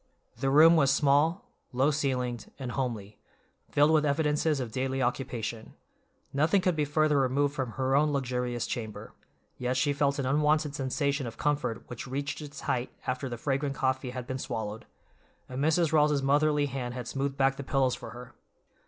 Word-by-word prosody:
The 135 +1 +1
room 160 +4 +7
was 140 -4 +4
small, 145 - +3 0.3
low 130 +4 +2
ceilinged, 125 -5 -2
and 130 -3 -5
homely, 115 -6 -4 0.5
filled 145 +1 +4
with 155 -1 +4
evidences 150 0 +1
of 125 -4 -4
daily 130 +2 -2
occupation; 120 -3 -3 0.6
nothing 155 +7 +3
could 180 -2 +1
be 150 -1 +1
further 150 0 +2
removed 140 +2 +1
from 130 -6 -3
her 135 0 0
own 150 +1 +3
luxurious 125 -3 -1
chamber, 110 -3 -6 0.5
yet 125 +1 -1
she 145 -2 +2
felt 140 0 +1
an 140 - -1
unwonted 150 +2 +2
sensation 140 0 -1
of 115 - -8
comfort 145 -6 -1
which 125 +2 -7
reached 140 +2 -3
its 145 -1 -8
height 125 0 -1
after 130 +1 -2
the 120 - -5
fragrant 140 +2 -1
coffee 130 -1 -1
had 125 0 -6
been 130 +1 -4
swallowed, 110 -3 -5 0.6
and 130 +2 -3
Mrs. 160 +1 +2
Rawls's 150 -2 +3
motherly 145 +1 +3
hand 125 -3 -4
had 125 -2 -5
smoothed 135 +2 -2
back 135 0 +2
the 140 - -5
pillows 135 -2 +1
for - - -7
her. 120 +1 -10
135 Hz, 175 wpm, -29 LUFS, 125-145 Hz, 0.6 s, room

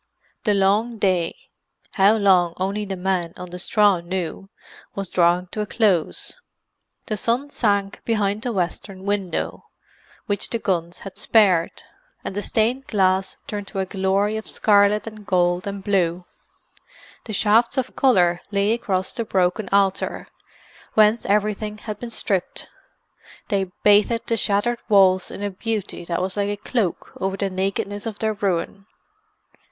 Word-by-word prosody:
The 210 -2 +3
long 210 +4 +2
day—how 195 +2 0
long 185 -5 +3
only 200 +3 -2
the 195 -1 -4
men 180 -2 -1
on 180 -1 -8
the 180 - -7
straw 205 0 +3
knew—was 190 +2 -7
drawing 175 +1 +3
to 215 - -3
a 210 - -3
close. 195 -9 0 0.7
The 215 - -2
sun 245 +7 -1
sank 200 -5 0
behind 210 -2 0
the 245 - -2
western 190 0 -3
window, 200 -3 -2 0.6
which 205 -1 0
the 230 - -1
guns 175 -5 -2
had 195 - -9
spared; 190 -7 +3 0.4
and - - -4
the 205 - -1
stained 240 +6 0
glass 190 -2 +1
turned 205 -1 -5
to - - -8
a 190 - 0
glory 195 +3 0
of 220 - -6
scarlet 205 0 +3
and 215 -1 -9
gold 180 -1 +1
and 200 -1 -5
blue. 180 -3 0 1.0
The 220 - -6
shafts 220 +5 +3
of 260 -1 -2
colour 180 -10 +3
lay 200 +1 +1
across 190 -5 -1
the 235 - -2
broken 190 0 0
altar, 195 -1 +1 0.7
whence 215 +1 +4
everything 210 +1 0
had 210 -1 -7
been 240 - -6
stripped; 195 -5 -2 0.8
they 195 -2 0
bathed 210 +3 +4
the 230 - +2
shattered 225 +4 0
walls 190 -3 +5
in 205 - -7
a 205 - -2
beauty 210 -1 -4
that 170 +1 -1
was 190 +2 -3
like 200 0 0
a 205 - -2
cloak 210 -3 -2
over 190 0 -2
the 195 -1 -1
nakedness 195 +2 -2
of 215 -2 -5
their 220 -1 0
ruin. 195 0 -2
200 Hz, 150 wpm, -22 LUFS, 185-215 Hz, 1.0 s, walls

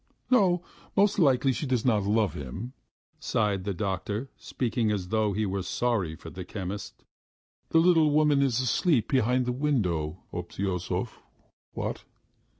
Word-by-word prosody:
"No, 185 -8 +4 0.3
most 200 +1 +4
likely 135 -4 +4
she 145 - -3
does 125 -3 0
not 110 -5 +3
love 105 -1 +2
him," 85 - -6 0.5
sighed 100 -4 0
the 100 - -1
doctor, 100 +6 -3
speaking 115 -2 -1
as 95 -4 -2
though 110 -1 +1
he 105 +2 0
were 95 0 -2
sorry 100 -5 -1
for 80 - -11
the 90 - -7
chemist. 100 +1 -6 0.7
"The - - +3
little 165 -2 +5
woman 150 -1 +3
is 130 -4 +2
asleep 130 - +2
behind 125 0 +2
the 125 - 0
window, 95 - -1
Obtyosov, 90 +1 -3 0.5
what? - - -4
110 Hz, 145 wpm, -28 LUFS, 95-135 Hz, 0.7 s, little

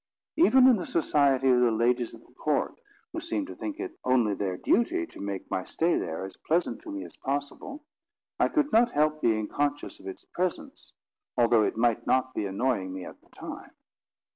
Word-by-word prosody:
Even 265 -6 +6
in 250 -4 +6
the 180 - -4
society 140 -4 +2
of 125 -1 +5
the 125 -1 +4
ladies 120 +1 +1
of 115 - -18
the - - -23
court, 150 +3 0 0.4
who 335 - -2
seemed 320 -3 -2
to - - -9
think 315 0 -5
it 375 0 -6
only 120 -5 +3
their 95 -2 -2
duty 335 - +1
to - - -12
make 100 -1 -5
my 95 - -1
stay 170 - 0
there 80 +4 -3
as 95 - -10
pleasant 165 -7 -1
to - - -10
me 100 -2 -5
as 85 - -14
possible, 145 - -4 0.6
I - - +4
could 300 -1 +1
not 235 +2 +4
help 155 +1 +2
being 110 -2 +1
conscious 145 +3 -2
of 95 - -11
its 95 - -8
presence, 180 -1 -4 0.4
although 115 -2 +5
it 105 - 0
might 115 -1 +1
not 130 0 +2
be 105 - -2
annoying 100 -1 -1
me 95 -1 -6
at - - -11
the - - -27
time. - - -9
130 Hz, 200 wpm, -28 LUFS, 110-180 Hz, 0.6 s, Even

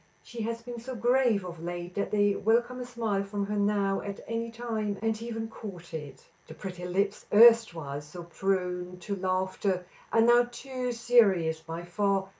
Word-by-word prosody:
She 235 -1 -7
has 230 +1 -3
been 240 0 -7
so 255 +2 -6
grave 240 -4 +2
of 170 -2 -8
late 175 +1 -5
that 200 +1 -1
they 205 0 +3
welcome 240 +4 +1
a 250 - -4
smile 225 -5 -1
from 200 0 -3
her 210 +1 -3
now 200 -1 +1
at 200 -1 -6
any 230 +1 -2
time, 225 -3 -3
and 225 0 -1
even 225 -1 -4
court 200 -6 -9
k. 150 -5 -7 0.3
The 155 - -10
pretty 180 0 -7
lips, 200 +3 -1
erstwhile 205 -11 +5
so 150 +4 -9
prone 180 0 -2
to 200 +3 -3
laughter, 185 0 -1 0.3
are 225 - +4
now 240 +1 +5
too 255 0 -4
serious 205 -9 +3
by 165 +1 -7
far. 195 +2 0
205 Hz, 175 wpm, -29 LUFS, 180-230 Hz, 0.3 s, erstwhile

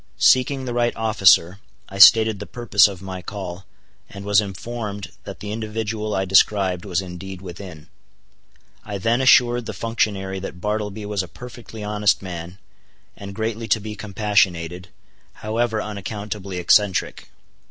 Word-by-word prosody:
Seeking 130 +1 +3
the 120 - -4
right 120 0 0
officer, 100 -4 +3 0.3
I 100 - -9
stated 110 0 +7
the 105 - -7
purpose 110 -5 +3
of 95 -2 -8
my 95 -1 -6
call, 95 -1 -7 0.4
and 100 0 -10
was 105 0 +4
informed 105 +1 -6
that - - -9
the 105 - -5
individual 110 0 -3
I 95 - 0
described 95 0 +2
was 90 -2 -1
indeed 95 +1 -8
within. 90 -3 -10 1.0
I 105 -2 -5
then 115 +6 +1
assured 120 -2 +4
the 110 - -4
functionary 100 -4 -2
that 90 -2 -8
Bartleby 105 +1 -3
was 100 -1 -1
a 90 - -7
perfectly 120 0 -10
honest 105 0 +1
man, 90 0 -7 0.6
and 100 0 -9
greatly 110 0 -3
to 110 - +2
be 105 0 -7
compassionated, 95 -4 0 0.5
however 110 +1 -2
unaccountably 100 -2 -6
eccentric. 95 +1 +1
105 Hz, 140 wpm, -22 LUFS, 95-110 Hz, 1.0 s, stated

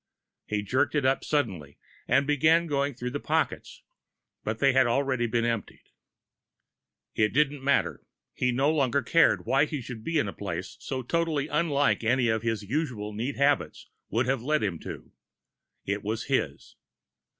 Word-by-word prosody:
He 105 -1 -1
jerked 125 +9 +1
it 145 -3 +1
up 135 +1 +2
suddenly 95 - -2 0.3
and 140 +2 +3
began 155 +4 +3
going 140 -3 -1
through 125 0 -4
the 145 - -3
pockets, - - -2 0.6
but 110 0 -2
they 135 +2 +3
had 130 -1 +4
already 130 -1 +1
been 115 +1 0
emptied. 115 -3 -4 1.2
It 110 -1 +1
didn't 145 0 +1
matter 140 +1 +1 0.3
he 125 0 0
no 135 +5 +2
longer 140 -2 +1
cared 165 +7 +3
why 135 +2 +3
he 150 -1 -4
should 120 -3 -8
be 165 +4 -1
in 140 - +1
a 95 - -5
place 90 -2 -5
so 130 -2 -4
totally 160 0 0
unlike 145 -4 +1
any 125 +2 +2
his 115 -2 -2
usually 110 -4 -3
neat 125 +6 -3
habits 140 0 0 0.2
would 120 +2 +1
have 130 -1 0
led 150 +3 0
him 90 -6 -2
to. - - -9 0.7
It 100 +1 -2
was 110 +2 -3
his. - - -2
130 Hz, 160 wpm, -27 LUFS, 115-145 Hz, 1.2 s, had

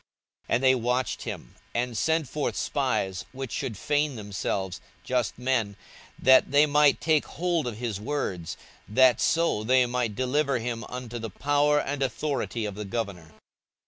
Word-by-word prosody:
42:020:020 - - +3
And 125 - 0
they 130 0 +6
watched 125 0 -1
him, - - -7 0.2
and 120 0 -1
sent 160 +3 +1
forth 145 +3 -2
spies, 100 -9 -1
which 135 -2 -6
should 110 -6 -3
feign 145 +5 0
themselves 95 -3 -3 0.2
just 125 -3 -1
men, 125 -5 0 0.4
that 130 0 +5
they 145 +2 +5
might 150 -1 +4
take 155 -2 +2
hold 170 -5 -1
of 115 -3 -4
his 115 -4 -3
words, 105 - -3 0.3
that 125 +2 +5
so 165 -10 +2
they 125 +2 +4
might 120 -3 -1
deliver 140 +3 +1
him 115 0 -3
unto 125 -2 -6
the 115 0 -5
power 145 +7 +2
and 145 -1 -3
authority 130 -2 -2
of 105 - -4
the 105 +2 -6
governor. 100 -7 -4
125 Hz, 160 wpm, -27 LUFS, 110-145 Hz, 0.4 s, they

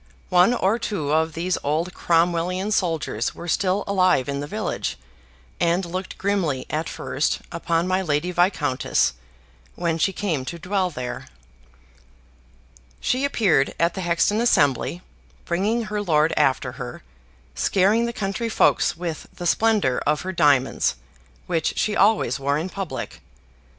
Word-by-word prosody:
One 180 +7 +5
or 215 +2 +1
two 175 -11 -2
of 160 +1 +1
these 175 +3 -1
old 160 +5 -1
Cromwellian 175 +3 +1
soldiers 165 - -1
were 170 - -8
still 185 +3 +1
alive 185 -9 +2
in 140 0 -2
the 145 - -4
village, - - -3 0.6
and 175 +2 +1
looked 185 +2 -5
grimly 190 -9 -1
at 155 +2 -2
first 145 - -1
upon 170 0 0
my 185 +1 +1
Lady 160 0 0
Viscountess, 170 - +1 0.6
when 165 -2 -1
she 195 - +2
came 175 -8 -2
to 170 - -5
dwell 185 +2 -1
there. 125 -6 -6 1.7
She 255 +2 0
appeared 205 - +2
at 170 +1 +2
the 190 - -4
Hexton 175 +5 +1
Assembly, 170 - +2 0.4
bringing 205 +7 0
her 210 0 -3
lord 160 -4 +2
after 135 -3 +2
her, - - -8 0.5
scaring 205 - +2
the - - -2
country 215 +1 -3
folks 215 - +2
with 170 -2 -5
the 175 - -8
splendor 205 - +2
of 150 0 +2
her 190 - -4
diamonds, 145 -6 +2 0.5
which 165 -3 -1
she 215 - 0
always 205 - +3
wore 140 +1 0
in 165 +5 -3
public. 180 -8 -6
175 Hz, 140 wpm, -23 LUFS, 155-195 Hz, 1.7 s, One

